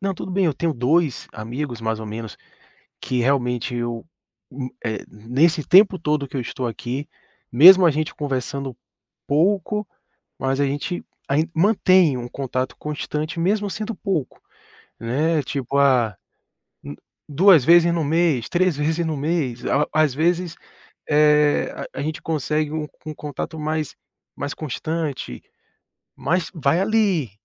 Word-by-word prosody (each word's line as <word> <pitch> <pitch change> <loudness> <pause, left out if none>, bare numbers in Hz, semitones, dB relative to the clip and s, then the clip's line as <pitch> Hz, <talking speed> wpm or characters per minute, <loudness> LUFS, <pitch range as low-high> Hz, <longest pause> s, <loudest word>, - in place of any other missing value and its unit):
não, 195 -1 -1
tudo 185 - -7
bem, 190 -2 +2
eu 150 - 0
tenho 165 +2 -1
2 145 +4 +1
amigos 120 +2 -5
mais 110 -1 -2
ou 110 - -7
menos 110 +1 -7 0.7
que 125 - -2
realmente 125 -2 0
eu 120 0 -4 0.5
u, 130 -1 -5 0.2
eh, 110 -3 -3
nesse 140 - +1
tempo 190 0 +6
todo 150 -3 -1
que - - -9
eu - - -1
estou 125 +1 -5
aqui, 125 +5 -5 0.4
mesmo 180 +9 +9
a 165 - +5
gente 155 +1 -3
conversando 135 -2 -3 0.5
pouco, 195 +6 +1 0.5
mas 135 +1 -1
a - - +3
gente 145 +6 -3 0.3
ain 155 +4 +1
mantém 185 - +4
um 120 0 -5
contato 130 -1 -3
constante, 150 +1 -4
mesmo 205 +4 +1
sendo 215 +2 -5
pouco, 180 - -3 0.6
né. 145 +7 0
Tipo, 140 0 -3
ah, 125 -7 +3 0.7
hum, 70 - -8 0.3
2 170 0 +6
vezes 170 0 +6
no 165 - 0
mês, 155 -4 +1
3 180 -2 +2
vezes 160 +3 0
no 160 -1 -2
mês, 140 -5 -2
às 150 - +2
às 155 -3 +3
vezes, 170 +2 0 0.5
é, 150 0 +3 0.2
a - - -5
gente 155 +1 -4
consegue 155 -1 -1
um 155 -1 -3 0.2
um 155 - -5
contato 150 +2 -6
mais 155 -1 -3 0.4
mais 145 +1 -4
constante, 155 - -4 0.7
mas 180 +1 -1
vai, 160 +3 +1
ali, 195 - +1
150 Hz, 145 wpm, -22 LUFS, 130-170 Hz, 0.7 s, mesmo